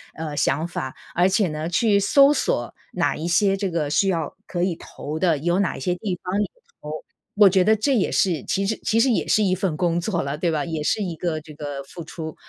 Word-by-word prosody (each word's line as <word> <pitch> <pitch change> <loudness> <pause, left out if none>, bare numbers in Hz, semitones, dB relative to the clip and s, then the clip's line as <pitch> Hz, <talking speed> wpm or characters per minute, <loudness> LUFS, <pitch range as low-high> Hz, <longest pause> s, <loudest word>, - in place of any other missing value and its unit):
呃， 155 -2 -5
想 155 +3 +1
法。 130 -6 -5 0.2
而 180 +2 +3
且 190 +1 +2
呢， 155 +2 -4
去 200 +3 +3
搜 275 +8 +5
索 - - -1 0.2
哪 - - +1
一 160 - -4
些 195 +3 +3
这 195 -1 -2
个 165 -4 -1
需 195 +6 +2
要 165 -5 -1
可 175 -1 -2
以 180 -2 0
投 155 -1 -7
的， 170 -4 +2
有 175 +5 0
哪 200 - 0
一 - - -7
些 180 +7 0
地 180 -1 -4
方 185 +3 -1
也 - - 0 0.3
投， 150 - -7 0.4
我 205 -1 +7
觉 190 0 +3
得 215 +3 +4
这 260 +6 +1
也 210 - +1
是 170 -8 +1
其 195 - 0
实 220 +3 0
其 225 - +2
实 255 +2 +4
也 225 - 0
是 215 - +3
一 190 -2 +2
份 185 -4 -2
工 170 -1 +1
作 175 -2 -1
了， 140 +2 -3
对 170 +3 0
吧， 155 -1 -1
也 160 -2 -3
是 215 - +1
一 175 -4 -4
个 160 -1 -2
这 155 0 -12
个 145 -2 -6
付 165 +5 -9
出。 160 -1 -7
175 Hz, 265 characters per minute, -23 LUFS, 155-195 Hz, 0.4 s, 我